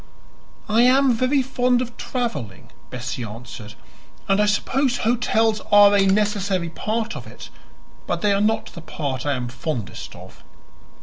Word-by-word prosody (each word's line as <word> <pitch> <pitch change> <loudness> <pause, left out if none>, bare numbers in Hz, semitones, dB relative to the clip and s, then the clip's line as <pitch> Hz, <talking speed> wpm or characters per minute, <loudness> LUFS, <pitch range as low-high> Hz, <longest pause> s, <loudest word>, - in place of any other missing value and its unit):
"I 220 +2 +3
am 260 +1 +5
very 255 +4 +1
fond 250 -1 +1
of 245 -1 -4
traveling," 145 - -5 0.2
Bessie 125 0 -5
answered, 115 0 -9 0.5
"and 195 +1 +3
I 210 - +3
suppose 245 +5 +1
hotels 225 -2 +1
are 205 0 +7
a 195 -1 +4
necessary 195 -3 +1
part 220 +6 -3
of - - -8
it. - - -11 0.6
But - - -2
they 205 -1 +3
are 200 - +1
not 220 +1 0
the 170 - -9
part 140 -4 -4
I 145 - +2
am 125 -1 -4
fondest 125 - -5
of." - - -14
205 Hz, 150 wpm, -22 LUFS, 145-235 Hz, 0.6 s, are